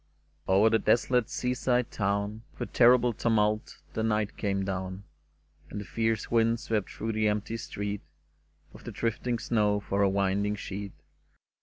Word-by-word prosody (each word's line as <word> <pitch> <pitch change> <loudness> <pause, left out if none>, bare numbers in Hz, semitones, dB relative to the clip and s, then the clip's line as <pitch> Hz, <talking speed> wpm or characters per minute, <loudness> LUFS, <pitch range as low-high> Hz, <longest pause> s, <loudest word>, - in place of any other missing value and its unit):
Over 100 +4 +5
the 115 - +4
desolate 120 +2 +2
sea 125 0 -1
side 125 -1 0
town 100 +1 -1 0.2
With - - -4
a - - -28
terrible 125 0 +5
tumult 110 -1 +1 0.2
the - - -2
night 110 -2 0
came 100 -2 -1
down, 95 0 -4 0.7
And 105 - -5
the 105 - -6
fierce 115 0 -1
wind 115 0 +3
swept 110 -4 -1
through 115 - -4
the 110 0 +1
empty 105 +2 -1
street, 100 -2 -4 0.7
With - - -13
the - - -5
drifting 120 +1 -1
snow 105 -3 +1
for 100 0 -1
a 100 - +4
winding 100 +1 +1
sheet. 100 -1 -6
105 Hz, 160 wpm, -29 LUFS, 100-115 Hz, 0.7 s, Over